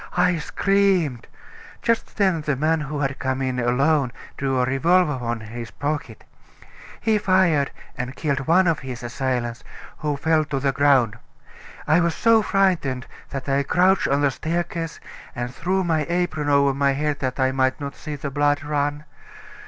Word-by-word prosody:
I 180 -1 +3
screamed. 190 - +1 0.6
Just 230 -1 0
then 190 -6 +2
the 150 -2 -1
man 155 +4 +1
who 150 0 -4
had 135 -1 -2
come 130 0 -1
in 130 -1 -1
alone 130 +3 +2 0.2
drew 135 -2 -1
a 125 - +3
revolver 150 +2 +2
from 120 -1 -3
his 115 +1 -7
pocket; 145 -6 -4 0.8
he 220 -2 +2
fired 185 -8 +3 0.3
and 125 +2 -5
killed 140 -3 -2
one 185 +3 +5
of 165 -3 +2
his 125 -3 -7
assailants, 120 -1 -2 0.4
who 150 -2 -1
fell 160 +1 +2
to 145 -2 -2
the 135 0 +1
ground. 130 -5 +3 0.7
I 155 +3 +5
was 170 -1 +1
so 230 -1 +4
frightened 180 -11 +1 0.2
that 135 -1 -6
I 140 0 +2
crouched 185 +6 +3
on 140 +1 +1
the 140 -1 +3
staircase 165 +2 -3 0.4
and 120 0 -4
threw 185 +6 0
my 160 -4 0
apron 170 -4 -1
over 140 -1 +4
my 140 0 +2
head 150 +1 -1
that 130 0 -3
I 130 0 +3
might 130 0 +1
not 140 -1 -5
see 150 -1 -6
the 140 0 -5
blood 145 +1 +1
run. 145 0 -1
145 Hz, 170 wpm, -23 LUFS, 130-165 Hz, 0.8 s, one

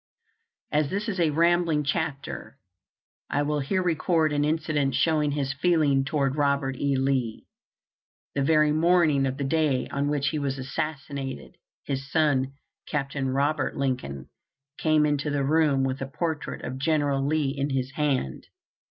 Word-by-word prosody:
As 150 -1 +1
this 200 +4 -2
is 195 -4 -2
a 165 -2 +3
rambling 170 0 +2
chapter, 150 -2 -3 0.7
I 145 - +1
will 150 0 0
here 185 +7 0
record 165 -2 +1
an 145 0 +1
incident 150 -3 0
showing 155 -2 +2
his 140 -2 -1
feeling 145 -3 +2
toward 140 -2 0
Robert 140 -2 +1
E. 140 +1 0
Lee. 130 -4 -1 0.9
The 140 - 0
very 155 +1 +4
morning 155 -3 +3
of 130 0 -3
the 140 - -2
day 145 -2 +1
on 140 +1 -1
which 145 -1 +1
he 155 - -2
was 135 -1 -2
assassinated, 140 0 -5 0.3
his 135 0 -4
son, 145 -5 +2 0.4
Capt. 140 -1 -2
Robert 140 +1 0
Lincoln, 125 - -2 0.5
came 155 -1 +3
into 150 0 0
the 145 -1 0
room 145 -2 +3
with 135 0 -2
a 135 - -2
portrait 160 +2 -3
of 130 +1 -5
General 145 -2 +1
Lee 145 -1 0
in 140 +1 -1
his 130 -1 -1
hand. 135 - -1
145 Hz, 150 wpm, -26 LUFS, 135-155 Hz, 0.9 s, very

